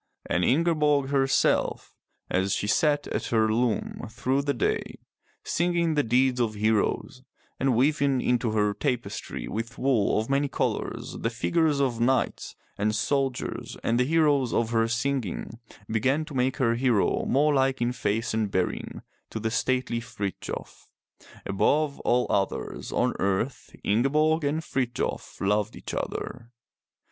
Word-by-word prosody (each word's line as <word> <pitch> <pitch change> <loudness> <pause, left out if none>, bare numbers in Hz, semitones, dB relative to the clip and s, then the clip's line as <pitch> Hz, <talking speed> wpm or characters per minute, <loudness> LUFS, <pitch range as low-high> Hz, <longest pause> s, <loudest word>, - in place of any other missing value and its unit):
And 85 - 0
Ingeborg 150 - +2
herself, 135 -1 +1 0.3
as 95 +1 0
she - - -2
sat 145 +7 +2
at - - -2
her 110 -2 +2
loom 120 0 -1
through 130 +4 0
the 140 0 0
day, 120 - -1 0.5
singing 170 -1 +1
the 150 - +3
deeds 125 +1 +2
of 110 -2 0
heroes, 110 +4 0 0.4
and 135 -2 +2
weaving 140 +1 +2
into 120 -1 +1
her 105 -1 +2
tapestry 120 +2 -3
with 115 +2 -5
wool 125 -7 +2
of 110 - -3
many 140 +1 +1
colors - - -3
the 115 - 0
figures 150 +5 +1
of 125 -4 0
knights 130 +2 0 0.2
and 105 +1 +1
soldiers 135 +3 -1
and 115 +1 +1
the - - +4
heroes 145 -3 +2
of 115 -1 +1
her 115 -1 +2
singing, 115 -2 -2 0.3
began 130 +8 +1
to 155 - -10
make 130 0 0
her 120 -5 +2
hero 120 -3 +2
more 150 +2 +3
like 135 -1 +2
in 120 0 +1
face 115 -1 -1
and 110 -2 0
bearing 95 -2 -2 0.3
to 110 - -5
the 110 +1 -2
stately 125 0 0
Frithjof. 115 -5 -6 0.6
Above 140 +9 +1
all 125 +1 +2
others 100 -1 -2
on - - +1
earth 100 +7 -1
Ingeborg 150 +9 +2
and 155 +3 0
Frithjof 125 -5 -3
loved 105 +2 0
each - - -7
other. 115 - -4
125 Hz, 145 wpm, -26 LUFS, 110-140 Hz, 0.6 s, the